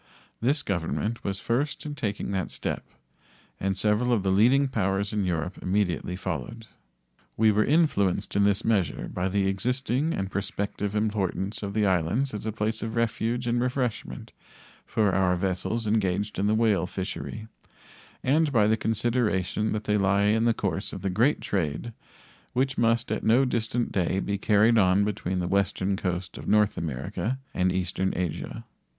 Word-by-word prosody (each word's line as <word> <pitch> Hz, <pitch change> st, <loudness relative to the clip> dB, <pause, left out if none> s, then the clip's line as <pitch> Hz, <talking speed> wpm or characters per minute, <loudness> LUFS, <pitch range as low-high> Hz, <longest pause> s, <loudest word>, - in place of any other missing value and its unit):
This 135 Hz, +5 st, +1 dB
Government 100 Hz, +5 st, -2 dB
was 95 Hz, -1 st, -2 dB
first 140 Hz, +7 st, -1 dB
in 150 Hz, -, -4 dB
taking 105 Hz, -7 st, -3 dB
that 95 Hz, -2 st, -1 dB
step, -, -, -4 dB, 0.7 s
and 95 Hz, 0 st, -1 dB
several 105 Hz, +5 st, +2 dB
of 110 Hz, -5 st, +2 dB
the 95 Hz, -, +1 dB
leading 125 Hz, +8 st, +4 dB
powers 100 Hz, -4 st, -1 dB
of 105 Hz, -1 st, 0 dB
Europe 90 Hz, 0 st, -2 dB
immediately 90 Hz, -2 st, 0 dB
followed. 95 Hz, +6 st, -5 dB, 0.7 s
We 110 Hz, 0 st, +5 dB
were 105 Hz, +1 st, +3 dB
influenced 140 Hz, -, +1 dB
in 100 Hz, -, +4 dB
this 100 Hz, -1 st, +2 dB
measure 105 Hz, -6 st, 0 dB
by 90 Hz, +1 st, -1 dB
the 100 Hz, 0 st, +1 dB
existing 125 Hz, -, 0 dB
and 95 Hz, 0 st, -3 dB
prospective 100 Hz, +1 st, -3 dB
importance 105 Hz, -2 st, -1 dB
of 100 Hz, -1 st, -5 dB
the 105 Hz, -1 st, +3 dB
islands 95 Hz, +9 st, +1 dB
as 105 Hz, +1 st, -5 dB
a -, -, 0 dB
place 110 Hz, +1 st, -2 dB
of 110 Hz, 0 st, -4 dB
refuge 115 Hz, +1 st, 0 dB
and 120 Hz, 0 st, +1 dB
refreshment 125 Hz, -2 st, -2 dB, 0.6 s
for 105 Hz, -3 st, +2 dB
our 95 Hz, -1 st, +3 dB
vessels 95 Hz, +5 st, -1 dB
engaged 105 Hz, -2 st, 0 dB
in 100 Hz, -, +2 dB
the 105 Hz, -, +3 dB
whale 110 Hz, -5 st, +2 dB
fishery, 100 Hz, +3 st, -5 dB, 0.8 s
and 150 Hz, +3 st, +3 dB
by 110 Hz, -5 st, +4 dB
the 110 Hz, +1 st, +3 dB
consideration 110 Hz, -3 st, 0 dB
that 105 Hz, 0 st, -2 dB
they 105 Hz, 0 st, +1 dB
lie 100 Hz, 0 st, +2 dB
in 110 Hz, +2 st, +3 dB
the 115 Hz, -, +4 dB
course -, -, -2 dB
of -, -, -7 dB
the 95 Hz, -, 0 dB
great 120 Hz, +10 st, +2 dB
trade 95 Hz, +4 st, -2 dB, 0.6 s
which 130 Hz, +1 st, +1 dB
must 115 Hz, 0 st, +1 dB
at -, -, -1 dB
no 120 Hz, +5 st, +4 dB
distant 120 Hz, -1 st, -1 dB
day 95 Hz, -1 st, 0 dB
be 100 Hz, 0 st, -2 dB
carried 110 Hz, +3 st, +4 dB
on 95 Hz, +1 st, +4 dB
between 95 Hz, -3 st, -2 dB
the 90 Hz, -1 st, -1 dB
western 100 Hz, 0 st, +1 dB
coast 95 Hz, -1 st, -3 dB
of -, -, -9 dB
North 105 Hz, 0 st, +3 dB
America 80 Hz, -, -3 dB, 0.2 s
and 90 Hz, 0 st, +1 dB
eastern 95 Hz, +1 st, -1 dB
Asia. 90 Hz, -4 st, -3 dB
105 Hz, 170 wpm, -27 LUFS, 95-115 Hz, 0.8 s, We